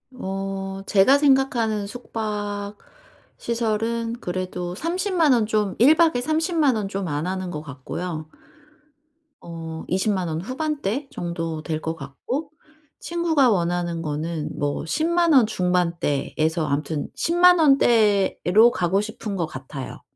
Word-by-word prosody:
어 195 -2 -4
제가 210 +8 +5
생각하는 265 -7 +2
숙박 205 -3 -4 0.6
시설은 230 0 -1
그래도 180 -2 -4
30 365 - -2
만원 275 -10 +4
좀 210 -3 0
1 275 +7 +6
박에 320 -5 +3
30 315 +5 -1
만 285 -6 +4
원 210 -2 -2
좀 195 -1 -3
안 150 +2 -2
하는 185 -1 -3
것 150 -3 -5
같고요. 155 +3 -6 1.1
어 165 -1 -7
20 190 +4 +1
만 185 -3 -1
원 160 0 -3
후반대 275 - -3
정도 165 -2 -4
될 155 -1 -2
것 160 +1 -3
같고 235 - -5 0.5
친구가 330 -6 +2
원하는 175 -3 0
거는 155 0 -3
뭐 145 0 -1
10 305 - 0
만 340 -1 +3
원 260 -5 +7
중반대에서 170 -4 0
아무튼 145 +1 -2
10 335 - -1
만 360 0 +7
원대로 225 - +4
가고 180 0 +1
싶은 215 -1 -5
것 170 - 0
같아요. 135 -1 -8
200 Hz, 215 characters per minute, -23 LUFS, 170-255 Hz, 1.1 s, 원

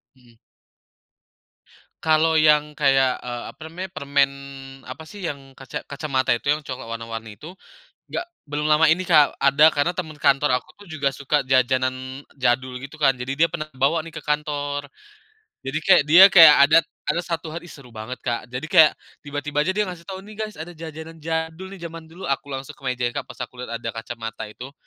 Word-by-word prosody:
Mhm. 120 -2 -23 1.7
Kalau, 160 0 +3
yang, 150 -1 +4
kayak, 135 -3 +2
eee, 120 -1 -5
apa - - -29
namanya, 180 +3 -6
permen, 140 -2 +1 0.6
apa 155 +5 -8
sih, 205 +5 -11
yang, 140 -6 -6
kaca 130 -2 -8
kacamata 140 -3 0
itu, 120 +4 -3
yang 150 0 0
coklat 130 -3 -7
warna-warni 115 -2 -7
itu. 165 +4 -10 0.5
Gak 350 - -4 0.2
belum 150 +1 -2
lama 155 +1 +5
ini 165 +4 +3
Kak, 150 -5 +4
ada, 150 +3 +5
karena 155 +5 0
temen 160 -4 -4
kantor 135 -2 +3
aku 180 +9 -18
juga 155 -6 -1
suka 140 +2 -1
jajanan 130 +1 0 0.2
jadul, 125 0 0
gitu 140 +4 -11
kan. 135 -3 +4
Jadi, 125 +2 -4
dia 165 +4 +2
pernah 155 -1 -4
bawa 145 +5 +1
nih, 165 - -10
ke - - -7
kantor. 145 -1 -2 0.8
Jadi 135 +2 -3
kayak 185 -5 +6
dia 175 +5 +10
kayak, 165 -5 +10
ada 155 +3 +6 0.3
ada 170 - +1
1 165 -3 -5
hari, 170 +1 -7
seru 135 -6 -14
banget 110 +3 -7
Kak. 120 +1 -3
Jadi, 125 +4 -5
kayak, 155 0 +5 0.2
tiba-tiba 145 0 -3
aja, 185 +5 +1
dia 210 - +2
ngasih 180 -3 -9
tahu, 190 0 -7
"Nih 215 +1 -11
guys, 215 -1 -5
ada 160 +3 -8
jajanan 160 0 -9
jadul 160 +3 -3
nih 195 -2 -11
jaman 165 -1 -9
dulu." 175 +4 -11
Aku 140 +1 -4
langsung 135 -1 -6
ke - - -24
meja 125 -2 -2
Kak, - - -5
pas - - -11
aku 125 0 -13
lihat, 115 -2 -5
ada 115 0 -6
kacamata 115 -1 -7
itu, 125 +5 -10
145 Hz, 190 wpm, -23 LUFS, 130-160 Hz, 1.7 s, dia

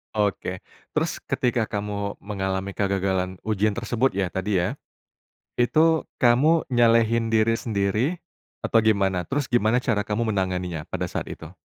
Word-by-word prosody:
Oke. 100 -3 -1 0.4
Terus - - -1
ketika 120 -3 0
kamu 100 -1 -3
mengalami 95 -1 -3
kegagalan 95 -2 -1
ujian 105 -1 +1
tersebut 120 +2 +1
ya 100 - +2
tadi 95 +1 0
ya, 90 0 0 0.8
itu 155 +7 +3 0.2
kamu 140 +7 +4
nyalahin 115 -2 +3
diri 110 +1 +3
sendiri 105 +1 0 0.6
atau 115 - +1
gimana? 95 -4 +2
Terus 140 +2 -2
gimana 120 0 +2
cara 105 -4 0
kamu 110 +2 -1
menanganinya 90 -5 -2
pada - - -4
saat - - -3
itu? 80 +3 -9
105 Hz, 135 wpm, -24 LUFS, 95-115 Hz, 0.8 s, kamu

